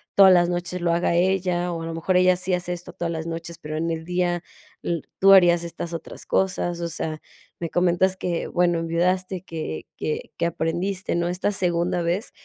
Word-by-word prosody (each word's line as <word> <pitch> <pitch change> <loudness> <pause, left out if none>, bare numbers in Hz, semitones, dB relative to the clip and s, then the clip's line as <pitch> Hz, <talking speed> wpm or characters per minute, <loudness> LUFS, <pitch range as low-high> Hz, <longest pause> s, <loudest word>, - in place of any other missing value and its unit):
todas 195 -1 +8
las 175 -1 +5
noches 175 +1 -2
lo 170 -1 +2
haga 170 0 +1
ella 180 -1 +1
o 165 - -4
a - - -5
lo 165 - -4
mejor 170 +3 0
ella 185 0 +5
sí 185 0 -1
hace 180 0 -1
esto 175 0 -8
todas 170 -1 -3
las 160 0 -4
noches, 165 0 -5
pero 155 -1 -6
en 165 +1 -1
el 160 0 -4
día 175 0 0 0.4
l 170 -2 -1 0.2
tú 195 +1 +7
harías 175 -3 +6
estas 170 0 -6
otras 165 - -7
cosas. 180 -2 0
O 170 - -1
sea, 155 -1 -4 0.4
me 170 - -3
comentas 180 +2 +2
que, 175 -2 -2
bueno, 175 -1 +2
enviudaste, 180 +3 0
que 155 - -5
que 155 - -3
que 170 - 0
aprendiste, 175 +4 -1
¿no?, 170 0 0
esta 180 +3 0
segunda 175 -2 0
vez. 175 +7 -1
175 Hz, 200 wpm, -24 LUFS, 170-180 Hz, 0.4 s, todas